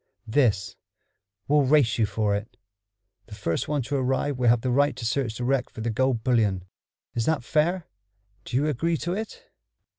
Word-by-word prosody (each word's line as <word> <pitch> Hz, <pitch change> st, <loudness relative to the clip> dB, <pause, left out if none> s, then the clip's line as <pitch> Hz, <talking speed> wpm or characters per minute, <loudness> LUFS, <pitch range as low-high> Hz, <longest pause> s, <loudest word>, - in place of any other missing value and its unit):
"This: 110 Hz, -5 st, +1 dB, 0.7 s
We'll 150 Hz, +1 st, +4 dB
race 135 Hz, -5 st, +3 dB
you 110 Hz, -, +3 dB
for 105 Hz, 0 st, 0 dB
it. 105 Hz, +2 st, -6 dB, 0.7 s
The 105 Hz, -, -9 dB
first 95 Hz, -6 st, -2 dB
one 145 Hz, -3 st, 0 dB
to 145 Hz, -, -3 dB
arrive 135 Hz, +2 st, 0 dB
will 120 Hz, -2 st, +4 dB
have 120 Hz, -1 st, +4 dB
the 125 Hz, -, -1 dB
right 145 Hz, +1 st, +3 dB
to 125 Hz, -2 st, -6 dB
search 115 Hz, -1 st, -1 dB
the 125 Hz, -, -4 dB
wreck 130 Hz, 0 st, +1 dB
for 110 Hz, -, -9 dB
the 115 Hz, +1 st, -1 dB
gold 125 Hz, 0 st, 0 dB
bullion. 105 Hz, -7 st, +2 dB, 0.5 s
Is 115 Hz, -1 st, -1 dB
that 155 Hz, -5 st, +1 dB
fair? 165 Hz, +6 st, +1 dB, 0.6 s
Do -, -, -6 dB
you 145 Hz, -, +2 dB
agree 160 Hz, +3 st, 0 dB
to 175 Hz, +4 st, -3 dB
it?" 225 Hz, -, -6 dB
125 Hz, 185 wpm, -26 LUFS, 110-145 Hz, 0.7 s, We'll